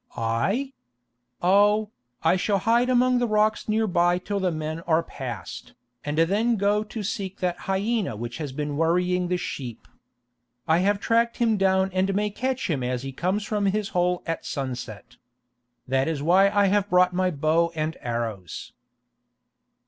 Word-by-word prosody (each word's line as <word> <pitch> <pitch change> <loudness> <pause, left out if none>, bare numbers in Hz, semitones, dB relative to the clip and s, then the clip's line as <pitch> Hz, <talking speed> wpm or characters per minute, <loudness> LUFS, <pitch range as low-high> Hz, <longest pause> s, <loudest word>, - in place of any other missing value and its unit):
"I? 195 - -1 0.7
Oh, 205 +3 +4 0.3
I 165 +2 +4
shall 200 +2 +1
hide 235 +5 +2
among 250 0 +3
the 245 - +1
rocks 215 0 +1
near 220 +1 +2
by 175 -2 +2
till 200 +2 -3
the 190 -1 +1
men 155 0 -4
are 165 0 +3
passed, 130 -4 -7 0.3
and 145 +1 -3
then 205 +8 +2
go 205 +1 +1
to 215 0 -6
seek 195 -1 -4
that 180 -2 -1
hyena 200 - 0
which 120 +5 -6
has 150 -4 -4
been 145 +1 -3
worrying 180 +2 +1
the 180 0 0
sheep. 125 -9 -6 0.8
I 160 +1 +4
have 200 +2 +2
tracked 230 +2 +1
him 230 -2 +2
down 190 -1 +2
and 190 +1 +1
may 210 +1 0
catch 260 +4 -2
him 150 -6 -1
as 125 0 -2
he 135 - -5
comes 185 +9 -1
from 210 -1 -1
his 205 +1 0
hole 180 -1 0
at 165 -1 -3
sunset. 125 -6 -6 0.7
That 130 +1 +1
is 155 -3 -2
why 190 +5 +5
I 205 0 +3
have 205 +1 +1
brought 180 -1 +4
my 185 0 +1
bow 165 +2 +1
and 155 0 -2
arrows." 115 -7 -4
180 Hz, 165 wpm, -25 LUFS, 155-210 Hz, 0.8 s, why